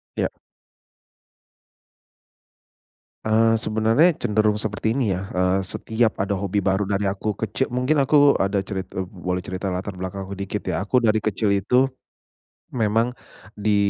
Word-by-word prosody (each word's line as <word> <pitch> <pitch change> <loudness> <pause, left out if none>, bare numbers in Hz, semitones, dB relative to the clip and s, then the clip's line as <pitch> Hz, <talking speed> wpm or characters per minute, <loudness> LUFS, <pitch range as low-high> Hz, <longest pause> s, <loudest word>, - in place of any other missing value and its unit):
Ya. - - 0 3.0
Eee, 115 +1 +4
sebenarnya 110 +11 +3
cenderung 105 -3 +1
seperti 110 +1 -1
ini 125 -6 0
ya, 95 - -5
eee, 90 +1 +2
setiap 110 +2 0
ada 100 0 -1
hobi 100 +1 -1
baru 95 +1 +1
dari 100 0 0
aku 100 +2 -2
keci 105 -2 -2
mungkin 130 +5 +1
aku 145 +1 +5
ada 100 0 +1
cerit 95 -1 -6
eee, 95 - -2
boleh 90 0 -3
cerita 95 +1 -4
latar 95 +1 -5
belakang 95 +1 -5
aku 100 - -6
dikit 100 +1 -4
ya, 100 - -1
aku 125 +4 +2
dari 110 -1 +3
kecil 110 -1 0
itu, 125 +7 +3 0.8
memang 115 +1 +1 0.5
di 105 0 +2
105 Hz, 145 wpm, -23 LUFS, 95-110 Hz, 3.0 s, aku